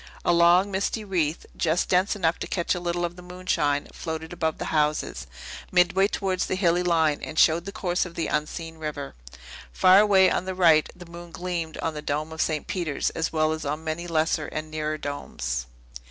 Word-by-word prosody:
A 175 - +4
long, 175 +3 +5
misty 200 +3 -1
wreath, 170 -5 -1
just 165 +1 +1
dense 185 +3 +2
enough 170 -4 0
to - - -4
catch 170 -3 0
a 180 - -3
little 175 0 -1
of 175 0 -5
the - - -10
moonshine, 180 -5 -1
floated 160 0 -5
above 160 -3 -1
the - - -4
houses, 150 0 0 0.4
midway 185 +2 +4
towards 190 -3 -1
the - - -1
hilly 175 -2 +2
line, 160 -4 +2
and 155 - -7
showed 165 +2 +4
the 200 - -5
course 180 -2 -1
of 175 -2 -8
the 165 - -1
unseen 160 +2 -3
river. 150 -3 -5 0.6
Far 185 - +6
away 195 -3 +5
on - - -1
the 190 0 -4
right, 165 -4 +5
the 180 0 -11
moon 170 0 -10
gleamed 170 -2 -4
on 165 - -1
the 150 - -6
dome 150 +2 -2
of 160 - -3
St. 155 -2 -1
Peter's 170 -6 -2
as 165 - -2
well 155 -1 +1
as 160 0 -3
on 150 +2 -3
many 165 +2 -4
lesser 160 -1 0
and 155 0 -6
nearer 155 0 -2
domes. 65 - -4
165 Hz, 200 wpm, -25 LUFS, 155-180 Hz, 0.6 s, Far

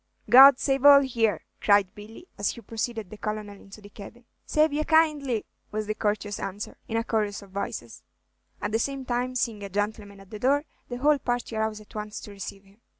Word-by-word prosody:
"God 265 +1 +10
save 270 -1 0
all 285 -1 +9
here!" 225 - 0 0.2
cried 200 -2 +3
Billy, 220 - -12
as 205 - -1
he 235 - -6
preceded 225 -2 -4
the 215 - -9
Colonel 215 -1 -4
into 200 +2 -14
the 205 - -13
cabin. 225 +4 -12 0.2
"Save 305 0 +2
ye 305 +1 0
kindly," 300 -8 +2 0.3
was 215 0 -3
the 215 - -2
courteous 205 -1 -2
answer, 200 +2 -6
in 225 - -2
a 230 - 0
chorus 210 -3 -2
of 195 - -16
voices; 200 +1 -5 0.6
at 205 - -1
the 225 - +1
same 275 +1 -3
time, 250 +1 -2
seeing 230 -4 -1
a 200 - -6
gentleman 205 0 -3
at 195 -1 -17
the 215 - -7
door, 280 +5 +2 0.2
the 245 - -4
whole 290 +3 +3
party 245 -3 -3
arose 220 -1 -2
at 210 - -18
once 210 0 -6
to 210 - -10
receive 195 0 -8
him. 200 +3 -24
220 Hz, 210 wpm, -26 LUFS, 205-255 Hz, 0.6 s, God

